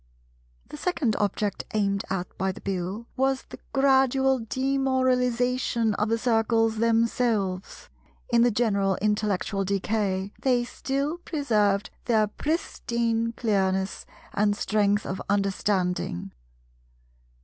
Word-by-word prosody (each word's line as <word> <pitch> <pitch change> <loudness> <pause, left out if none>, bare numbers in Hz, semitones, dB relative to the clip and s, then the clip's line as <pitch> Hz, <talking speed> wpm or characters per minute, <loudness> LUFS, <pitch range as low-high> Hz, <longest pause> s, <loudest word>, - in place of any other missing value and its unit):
The - - -8
second 295 - 0
object 205 0 -1
aimed 200 -2 +1
at 185 -2 -3
by 190 +1 -1
the - - -10
Bill 195 +4 -3
was 265 0 +1
the - - -12
gradual 265 -1 +3
demoralization 250 -2 +1
of 210 +1 -1
the 230 - +2
Circles 225 -1 +2
themselves. 225 -4 0 0.5
In 235 - +6
the 240 - +5
general 200 -4 +1
intellectual 210 -1 0
decay 195 0 -1
they 250 -2 +2
still 275 +6 -2
preserved 210 - 0
their 220 -3 +3
pristine 230 -3 -1
clearness 190 -4 0 0.3
and 205 0 +2
strength 205 -1 +1
of 190 - -4
understanding. 190 - 0
225 Hz, 105 wpm, -26 LUFS, 200-250 Hz, 0.5 s, In